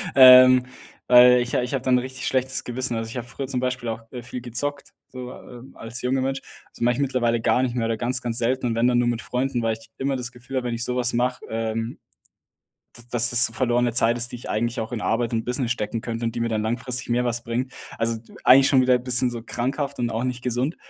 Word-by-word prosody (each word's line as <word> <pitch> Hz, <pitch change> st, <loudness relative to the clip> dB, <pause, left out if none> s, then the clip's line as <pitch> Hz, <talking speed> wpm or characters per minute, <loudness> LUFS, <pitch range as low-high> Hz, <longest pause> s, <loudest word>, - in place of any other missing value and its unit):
ähm, 130 Hz, -1 st, +9 dB, 0.4 s
weil 125 Hz, 0 st, +7 dB
ich 120 Hz, 0 st, -3 dB
ich 125 Hz, +2 st, -1 dB
habe 135 Hz, -2 st, -2 dB
dann 125 Hz, -1 st, +3 dB
richtig 130 Hz, +1 st, -6 dB
schlechtes 130 Hz, 0 st, -1 dB
Gewissen 125 Hz, 0 st, -3 dB
also 115 Hz, 0 st, -4 dB
ich 125 Hz, -, -7 dB
habe 120 Hz, -, -5 dB
früher 135 Hz, +2 st, -6 dB
zum 130 Hz, -2 st, -2 dB
Beispiel 125 Hz, -1 st, -2 dB
auch, 115 Hz, 0 st, -4 dB
äh, 125 Hz, -2 st, -7 dB
viel 125 Hz, 0 st, -7 dB
gezockt, 140 Hz, +4 st, -4 dB, 0.2 s
so, 125 Hz, -1 st, -8 dB
äh, 120 Hz, -2 st, -12 dB
als 115 Hz, +2 st, -8 dB
junger 130 Hz, +1 st, 0 dB
Mensch. 135 Hz, +1 st, -2 dB, 0.3 s
Das -, -, -17 dB
mache 120 Hz, +1 st, +3 dB
ich -, -, -5 dB
mittlerweile 120 Hz, -4 st, 0 dB
gar 115 Hz, +2 st, +2 dB
nicht 125 Hz, -2 st, -2 dB
mehr 115 Hz, -2 st, 0 dB
oder 115 Hz, -1 st, -1 dB
ganz 125 Hz, +2 st, 0 dB
ganz 120 Hz, -1 st, -3 dB
selten 125 Hz, +1 st, 0 dB
und 115 Hz, -, -1 dB
wenn 115 Hz, +2 st, +2 dB
dann 120 Hz, -1 st, +3 dB
nur 120 Hz, -, +1 dB
mit 120 Hz, -1 st, -1 dB
Freunden, 125 Hz, -1 st, -2 dB
weil 115 Hz, -1 st, +1 dB
ich 115 Hz, 0 st, -12 dB
immer 135 Hz, 0 st, -1 dB
das 125 Hz, -1 st, -5 dB
Gefühl 130 Hz, +2 st, -7 dB
habe, 125 Hz, -1 st, -2 dB
wenn 120 Hz, -, -2 dB
ich 115 Hz, -, -3 dB
so 125 Hz, -, -2 dB
was 125 Hz, 0 st, 0 dB
mache, 125 Hz, +1 st, -1 dB
ähm 115 Hz, +1 st, -3 dB, 1.0 s
d 120 Hz, -, -11 dB
dass 120 Hz, 0 st, +2 dB
das 120 Hz, 0 st, +3 dB
verlorene 120 Hz, -1 st, +1 dB
Zeit 115 Hz, 0 st, +2 dB
ist, 120 Hz, 0 st, -2 dB
die -, -, -5 dB
ich 120 Hz, -, -9 dB
eigentlich 115 Hz, +2 st, -1 dB
auch 110 Hz, -, -5 dB
in 115 Hz, -, -3 dB
Arbeit 115 Hz, +2 st, -1 dB
und 115 Hz, -1 st, -1 dB
Business 125 Hz, -1 st, -2 dB
stecken 110 Hz, -1 st, -2 dB
könnte 115 Hz, 0 st, -4 dB
und 115 Hz, 0 st, -2 dB
die 120 Hz, -, -3 dB
mir 115 Hz, -, 0 dB
dann 110 Hz, -1 st, -1 dB
langfristig 125 Hz, +3 st, -2 dB
mehr 120 Hz, +1 st, +1 dB
was 120 Hz, -1 st, -2 dB
bringt. 125 Hz, +2 st, -3 dB, 0.3 s
Also 115 Hz, 0 st, 0 dB
e 110 Hz, +1 st, -15 dB
eigentlich 135 Hz, +1 st, +7 dB
schon 130 Hz, -, +4 dB
wieder 125 Hz, -1 st, +4 dB
bisschen 125 Hz, 0 st, +1 dB
so 120 Hz, -1 st, -6 dB
krankhaft 140 Hz, +3 st, -3 dB
und 120 Hz, -1 st, 0 dB
auch 115 Hz, +3 st, -2 dB
nicht 125 Hz, -1 st, -3 dB
gesund, 125 Hz, +5 st, -1 dB
120 Hz, 255 wpm, -23 LUFS, 115-125 Hz, 1.0 s, ähm